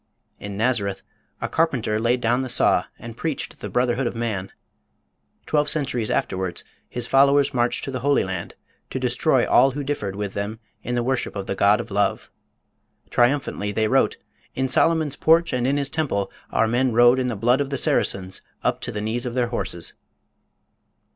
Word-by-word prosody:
In 100 -1 -6
Nazareth 105 -4 0 0.4
a - - -1
carpenter 125 -10 0
laid 120 +2 +1
down 120 +2 +2
the 130 - -4
saw - - +3
and 115 -1 -9
preached 155 +2 -4
the - - -6
brotherhood 125 +1 +1
of 120 - -4
man. 105 -5 -3 0.9
Twelve 150 -1 +1
centuries 125 -7 0
afterwards 95 -2 -1 0.3
his 120 -1 -2
followers 140 +2 +4
marched 120 -1 0
to 135 - -4
the 130 - -3
Holy 140 +3 +2
Land 95 -2 -5 0.3
to - - -3
destroy - - +2
all 130 +3 +5
who 140 +2 -4
differed 110 -9 -3
with 100 -1 -4
them 105 +2 -4 0.2
in 120 - -3
the 120 - 0
worship 130 -2 -1
of 100 -1 -4
the - - -2
God 100 +2 +3
of 120 - -6
Love. 100 +1 0 0.8
Triumphantly 120 -5 +1
they 110 +1 +1
wrote - - +2 0.4
"In 130 0 0
Solomon's 160 +1 +2
Porch 165 +2 +3
and 125 0 0
in 140 +2 +1
his 140 -1 -2
temple 100 -12 -1 0.2
our 115 - +2
men 120 +2 +1
rode 120 +2 +6
in 130 - 0
the 120 - -2
blood 120 +6 +2
of 140 - -2
the 140 - -2
Saracens 95 -6 0 0.2
up - - 0
to - - -3
the 105 - -4
knees 115 +3 -2
of 120 - -5
their 125 -2 +1
horses." 95 -7 -1
120 Hz, 185 wpm, -23 LUFS, 105-135 Hz, 0.9 s, rode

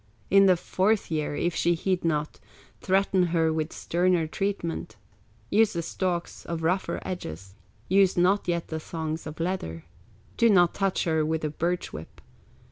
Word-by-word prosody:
In 195 0 +7
the 185 -2 +5
fourth 190 +3 0
year, 150 -2 -1
if 175 +3 0
she 170 +1 +2
heed 185 +2 -1
not, 150 -2 -1 0.4
Threaten 190 -1 +2
her 165 -1 +1
with 155 0 -2
sterner 175 -1 +1
treatment, 195 0 -3 0.6
With 220 +1 +4
the 170 -1 -2
stalks 175 0 -3
of 165 -1 -4
rougher 180 +4 0
edges, 95 - -6 0.3
Use 190 0 +3
not 185 +3 +3
yet 170 -1 -1
the 160 - -3
thongs 160 0 -5
of 155 +1 -8
leather, 165 - -3 0.5
Do 230 - +5
not 175 -5 +5
touch 195 -2 0
her 160 -2 +1
with 160 +1 -1
the 155 - -2
birch 175 +3 -2
whip. 75 - -9
170 Hz, 160 wpm, -26 LUFS, 160-185 Hz, 0.6 s, In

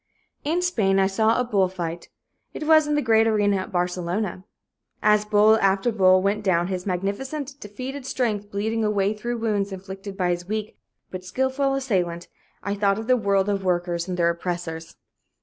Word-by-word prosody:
In 335 +5 0
Spain 210 - +2
I 195 - +4
saw 220 +4 +2
a - - +2
bull 200 -6 +2
fight. 170 -2 -6 0.5
It 305 - -4
was 310 -1 +5
in 295 - +1
the 295 - +1
great 225 -1 +4
arena 205 -2 +2
at 190 +3 -5
Barcelona. 180 +2 -2 0.6
As 210 0 +4
bull 210 +1 +5
after 195 +4 +2
bull 185 -3 +4
went 205 +2 0
down, 175 -2 +1
his 185 0 -4
magnificent, 265 - -3
defeated 255 +6 -7
strength 215 -6 -1
bleeding 220 +2 -1
away 205 -1 +1
through 240 +3 -4
wounds 210 -3 -1
inflicted 195 +1 -8
by 180 -2 +1
his 175 0 -3
weak 215 +1 -3 0.4
but 185 -1 -6
skillful 265 +7 0
assailant, 180 -10 -1 0.3
I 200 - -1
thought 200 -1 +1
of 220 - -5
the 255 +2 +4
world 200 -4 +1
of 200 -1 -1
workers 175 -1 -1
and 180 -1 -3
their 170 -1 +3
oppressors. 170 -1 -5
200 Hz, 180 wpm, -24 LUFS, 185-225 Hz, 0.6 s, was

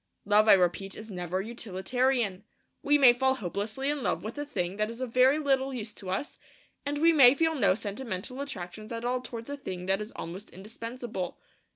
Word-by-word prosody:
Love, 210 +2 +4
I - - +9
repeat, 190 +1 +1
is 215 0 -9
never 180 0 -3
utilitarian. 225 0 -1 0.4
We 290 +1 +4
may 260 -4 +8
fall 265 +2 +2
hopelessly 215 +5 -3
in 295 -2 -3
love - - -1
with 220 +2 -5
a 290 - -4
thing 180 -8 -2
that 215 0 0
is 230 +1 -8
of 255 -3 -4
very 260 +3 +5
little 270 -3 +1
use 215 -3 -5
to 190 - -9
us; 195 +10 -3 0.5
and 290 0 -1
we 330 +3 +5
may 270 -4 +8
feel 320 +2 +2
no 205 -10 +3
sentimental 220 +3 -5
attractions 215 -5 -7
at 230 +1 -4
all 250 +1 0
towards 230 -2 -8
a 285 - -4
thing 185 -10 -6
that 195 +2 +1
is 210 +2 -6
almost 180 +5 -7
indispensable. 220 -1 -6
230 Hz, 200 wpm, -29 LUFS, 195-265 Hz, 0.5 s, I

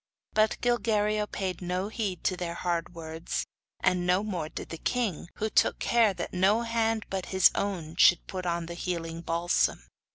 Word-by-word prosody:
But 215 0 +3
Gilguerillo 215 -3 +1
paid 185 -3 -3
no 180 +3 -2
heed 205 -6 -3
to 185 - +1
their 175 -1 -4
hard 175 -1 -2
words, 160 0 -4 0.4
and 180 -1 +2
no 180 +3 +3
more 180 -7 -3
did - - -7
the 165 - -6
king, 220 -10 -1
who 220 - -1
took - - +3
care 230 -3 +3
that - - -5
no 195 +5 +3
hand 225 -1 0
but 190 -1 -3
his 190 -1 +5
own 175 -6 -3
should 175 -2 +6
put 185 -1 -5
on 170 0 -1
the 170 - -6
healing 165 -2 -4
balsam. 170 - +1
185 Hz, 175 wpm, -28 LUFS, 170-215 Hz, 0.4 s, should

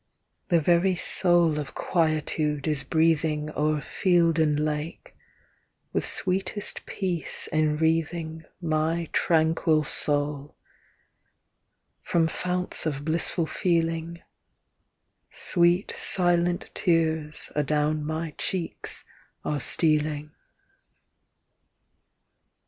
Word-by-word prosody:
The 170 - +4
very 175 +4 +3
soul 175 -3 +3
of 145 - -6
quietude 155 -3 0
is 150 -3 +1
breathing 155 0 +1
O'er 150 0 0
field 170 -3 +2
and 150 -2 +2
lake, 150 +1 -3 0.8
with - - 0
sweetest 190 +2 -2
peace 180 -5 -2
enwreathing 160 +1 0
My 165 0 0
tranquil 160 -1 +2
soul, 145 0 -2 1.5
from 165 -1 +1
founts 180 +1 0
of 145 -1 -3
blissful 165 +1 -1
feeling, 165 -1 -1 1.1
Sweet 175 +2 +1
silent 175 -1 +1
tears 160 -3 0
adown 150 +1 +1
my 160 +1 -3
cheeks 180 -3 -4 0.4
are 145 -2 -1
stealing. 150 -1 +1
160 Hz, 80 wpm, -26 LUFS, 150-170 Hz, 1.5 s, The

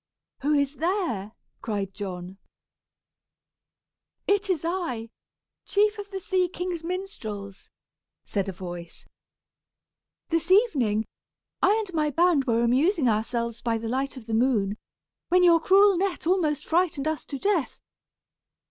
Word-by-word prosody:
"Who 295 +2 +1
is 280 0 0
there?" 315 - -1 0.3
cried 200 -3 -3
John. 190 -1 -6 1.9
"It 405 0 +1
is 330 -4 0
I 295 -11 -3 0.5
chief 420 +1 +1
of 405 0 -7
the 390 -1 -5
sea 370 -1 0
king's 355 -2 -4
minstrels," 240 - -6 0.6
said 200 -1 -2
a - - -2
voice. 175 -2 -8 1.2
"This 330 0 0
evening, 270 - +3 0.6
I 415 - +5
and 370 - -11
my 305 -2 +1
band 330 -2 +3
were 235 -1 +2
amusing 275 - +3
ourselves 235 +1 -1
by 230 -2 0
the 225 0 -5
light 270 +2 -2
of 240 - -10
the 225 - -5
moon, 220 -4 +1 0.5
when 360 0 +4
your 340 -2 +6
cruel 390 +3 +5
net 385 -4 -1
almost 315 -5 +1
frightened 330 -4 +1
us 315 -1 -2
to 280 - -5
death. 365 -2 0
295 Hz, 130 wpm, -26 LUFS, 225-365 Hz, 1.9 s, your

